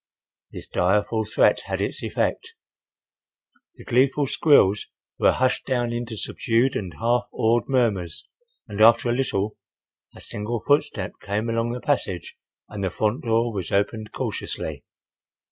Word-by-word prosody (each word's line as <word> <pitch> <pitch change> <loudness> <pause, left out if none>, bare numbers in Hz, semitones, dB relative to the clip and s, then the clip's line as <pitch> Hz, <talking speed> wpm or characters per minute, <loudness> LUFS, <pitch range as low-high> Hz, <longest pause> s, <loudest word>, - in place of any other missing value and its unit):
This - - -6
direful 105 +4 +1
threat 110 - +3
had - - -3
its - - -2
effect. - - -2 1.2
The - - -13
gleeful 135 +3 +2
squeals 115 -9 +4 0.3
were - - +5
hushed 130 0 0
down 120 -2 0
into 120 -2 -4
subdued 120 +4 0
and 90 -4 -4
half 120 +2 0
awed 115 -1 +1
murmurs 105 - 0 0.4
and 100 +1 -4
after 115 +2 +6
a - - +2
little 110 -5 -1 0.6
a - - -12
single 110 +3 -4
footstep 145 +6 0
came 105 +3 -2
along 115 +1 0
the 125 - -5
passage 110 -11 -2 0.3
and 105 -2 -6
the 95 - +1
front 110 - -1
door 115 0 +1
was 95 -4 -4
opened 105 +2 -1
cautiously. - - -4
115 Hz, 140 wpm, -24 LUFS, 105-120 Hz, 1.2 s, after